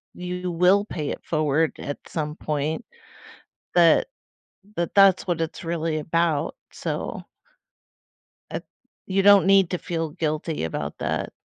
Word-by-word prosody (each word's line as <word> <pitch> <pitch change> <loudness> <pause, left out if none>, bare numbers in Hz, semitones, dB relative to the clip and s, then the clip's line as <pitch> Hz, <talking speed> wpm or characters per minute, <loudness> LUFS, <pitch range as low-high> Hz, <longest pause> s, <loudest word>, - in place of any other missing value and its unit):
you 180 0 -4
will 180 +4 +4
pay 150 -8 -4
it - - -5
forward 155 0 +1
at 145 - -5
some 150 -2 -3
point, 155 +5 -2 0.9
that 175 - +5 0.7
that 170 0 -2
that's 195 -2 +6
what 175 -2 0
it's 160 - -4
really 165 -1 -1
about, 160 -1 0 0.2
so - - -4 1.3
uh, - - -2 0.5
you 195 +1 +1
don't 200 -1 +7
need 195 -2 +5
to 180 - -1
feel 165 -2 -3
guilty 155 - -2
about 80 - -4
that. - - -2
165 Hz, 130 wpm, -24 LUFS, 155-180 Hz, 1.3 s, don't